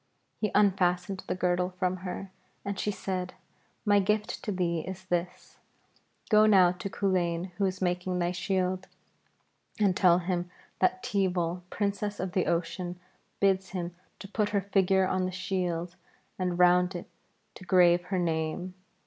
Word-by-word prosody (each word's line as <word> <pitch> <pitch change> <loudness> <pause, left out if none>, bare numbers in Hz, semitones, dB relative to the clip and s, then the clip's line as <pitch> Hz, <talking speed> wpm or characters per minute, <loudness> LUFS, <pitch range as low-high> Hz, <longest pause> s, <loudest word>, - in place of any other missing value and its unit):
He 215 - 0
unfastened 190 -1 +2
the - - -1
girdle 180 0 0
from 185 0 0
her 185 +1 -6 0.3
and 200 -1 -3
she - - 0
said, 185 -2 -3 0.5
'My 205 -1 +5
gift 210 +2 0
to 210 - -2
thee 175 -3 0
is 185 +3 -7
this: 180 -1 -3 0.7
Go 215 0 +7
now 185 -4 +6
to 180 +2 -5
Culain 180 -2 0
who 200 - +2
is 185 0 -2
making 180 0 -1
thy 175 0 0
shield, 185 0 -1 0.9
and 200 -3 +3
tell 180 -3 +5
him 180 0 -2 0.3
that 245 +7 +2
Teeval, 180 -5 0
Princess 205 0 -2
of 185 0 -2
the 185 -1 0
Ocean, 175 +1 -2 0.4
bids 190 -1 +2
him 175 -2 -4 0.2
to 195 - -9
put 210 +1 0
her 200 -1 +1
figure 190 -1 +2
on 185 0 0
the 185 - -2
shield 180 -2 -2 0.4
and 180 -1 -1
round 180 +1 +4
it 175 - -6 0.5
to - - -12
grave 175 -1 +4
her 190 +1 -2
name. 165 +1 -1
185 Hz, 155 wpm, -29 LUFS, 180-195 Hz, 0.9 s, Go